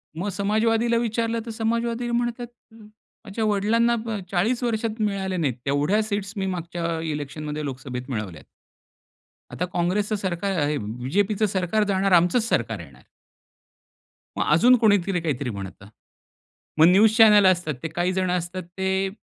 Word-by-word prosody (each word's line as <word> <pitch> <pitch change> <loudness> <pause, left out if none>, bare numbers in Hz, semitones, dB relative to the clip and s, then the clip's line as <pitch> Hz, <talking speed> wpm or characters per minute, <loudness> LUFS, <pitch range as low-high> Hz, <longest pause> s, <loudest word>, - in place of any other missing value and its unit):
मग 180 +6 -3
समाजवादीला 225 +4 +1
विचारलं 230 0 -1
तर 230 - -6
समाजवादी 235 +2 -2
म्हणतात, 240 0 -2 0.3
माझ्या 215 0 -9
वडिलांना 220 +3 +2
ब 220 -2 -3
40 225 +8 0
वर्षात 225 -1 -2
मिळाल्या 195 -3 -1
नाहीत. 145 -6 0
तेवढ्या 145 +10 +1
सीट्स 205 -2 -4
मी 195 - -1
मागच्या 170 -2 -3
इलेक्शनमध्ये 150 +1 -5
लोकसभेत 130 -1 -6
मिळवल्यात. 105 - -5 1.1
आता 180 - -2
काँग्रेसचं 185 +4 -1
सरकार 190 -1 -2
आहे 145 0 0
बीजेपीचं 145 - -1
सरकार 195 +2 0
जाणार, 195 0 +1
आमचचं 175 +6 +4
सरकार 115 - -1
येणार. 75 -5 -13 1.4
मग - - +1
अजून 240 +11 +6
कोणीतरी 200 -5 +2
काहीतरी 140 -5 -2
म्हणतं. 100 -1 -8 0.9
मग 160 - +8
न्यूज 210 +4 +5
चॅनेल 210 -3 +7
असतात 175 -5 +2
ते 165 - -1
काही 175 +3 -1
जण 185 -1 0
असतात 180 +1 -3
ते 190 0 0
190 Hz, 135 wpm, -24 LUFS, 165-220 Hz, 1.4 s, मग